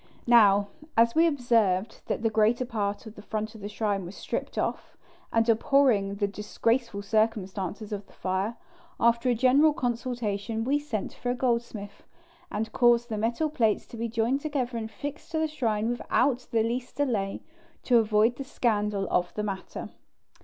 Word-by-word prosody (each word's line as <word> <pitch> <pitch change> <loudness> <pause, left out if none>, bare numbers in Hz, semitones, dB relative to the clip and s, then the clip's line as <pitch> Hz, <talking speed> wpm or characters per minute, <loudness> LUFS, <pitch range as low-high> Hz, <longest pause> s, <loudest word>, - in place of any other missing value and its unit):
Now, 205 -4 +5 0.3
as 230 0 +5
we 330 +1 +5
observed 230 - +1
that - - -2
the 225 - +2
greater 220 +3 +2
part 205 -4 -3
of 220 - -9
the 205 - -12
front 215 +1 -4
of 220 - -12
the 205 - -5
shrine 205 -2 -1
was 180 +3 -8
stripped - - -4
off, - - -3 0.3
and 225 0 +2
abhorring 225 -4 +3
the 205 0 0
disgraceful 210 +2 -1
circumstances 210 -1 -1
of 205 -1 -5
the - - -20
fire, 190 +5 -2 0.4
after 235 +2 +3
a 245 - +3
general 270 +6 +5
consultation 230 -4 -2
we 280 +5 +1
sent 245 -9 -4
for 245 - -4
a 245 - +1
goldsmith, 235 -5 -2 0.5
and 220 +1 -3
caused 240 -1 +3
the 215 - -2
metal 235 +8 0
plates 225 -7 +1
to - - -9
be 230 +1 -2
joined 235 +5 0
together 270 -5 -2
and 225 -1 -3
fixed 290 +6 -7
to - - +1
the 315 0 +1
shrine 225 -8 -1
without 245 +2 0
the 225 -1 +2
least 245 +2 -3
delay, 220 -9 -1 0.4
to 245 -2 +5
avoid 220 +2 +2
the 275 - -4
scandal 210 -7 0
of 180 0 +1
the 210 - -2
matter. 195 -2 -5
225 Hz, 175 wpm, -27 LUFS, 210-245 Hz, 0.5 s, Now